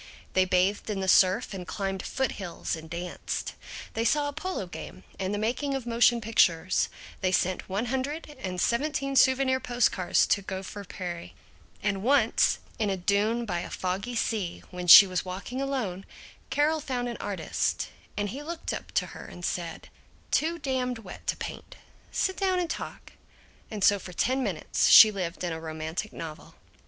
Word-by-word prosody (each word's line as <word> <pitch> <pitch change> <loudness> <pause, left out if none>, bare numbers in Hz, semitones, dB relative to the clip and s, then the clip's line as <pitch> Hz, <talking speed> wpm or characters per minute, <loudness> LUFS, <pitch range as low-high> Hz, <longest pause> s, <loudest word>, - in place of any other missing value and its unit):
They 185 0 +4
bathed 185 +4 +1
in 205 -2 -2
the 190 - -2
surf 185 +1 +4
and 180 -2 -6
climbed 195 -2 -3
foothills 200 -13 -3
and 160 0 -10
danced, 175 +1 -4 0.4
they 225 - -1
saw 290 +4 +2
a - - -7
polo 320 - -3
game 180 +1 -9 0.2
and 190 0 -1
the 205 - -1
making 250 +6 -1
of 265 -3 -4
motion 235 0 +3
pictures, 185 -5 +2 0.3
they 185 - +1
sent 185 0 0
one 200 +5 -1
hundred 285 +5 -3
and 185 -4 -4
seventeen 275 +5 0
souvenir 260 0 +4
post 245 -2 +2
cards 185 -2 +2
to 200 - +2
Gopher 190 +1 -6
Prairie, 175 - -6 0.5
and 195 -1 0
once, 275 +7 +3 0.2
on 215 -2 +1
a 195 - -1
dune 210 +6 +1
by 175 -5 -2
a 175 - -6
foggy 195 +6 -3
sea 210 -6 -2
when 180 -1 -6
she 200 - +12
was 185 -2 -2
walking 195 +8 -5
alone, 225 -9 -3 0.4
Carol 305 +2 +2
found 255 -4 -3
an 235 - -4
artist, 190 -6 -2 0.3
and 205 0 -1
he 265 +8 -6
looked 330 +2 -5
up - - -5
at - - -1
her - - -10
and 175 - -7
said, 170 -1 -4 0.4
"Too 330 +2 +1
damned 260 -4 -1
wet 205 -5 -11
to - - 0
paint; - - -7 0.4
sit 380 - 0
down 380 -2 +1
and 350 -2 -1
talk," - - -7 0.6
and 210 -3 -4
so 205 +1 +5
for 180 -1 -9
ten 260 +9 +1
minutes - - 0
she 215 - +10
lived 185 -4 -4
in 175 -2 -1
a 160 - -5
romantic 160 +6 -4
novel. 155 -2 -9
205 Hz, 175 wpm, -28 LUFS, 185-260 Hz, 0.6 s, she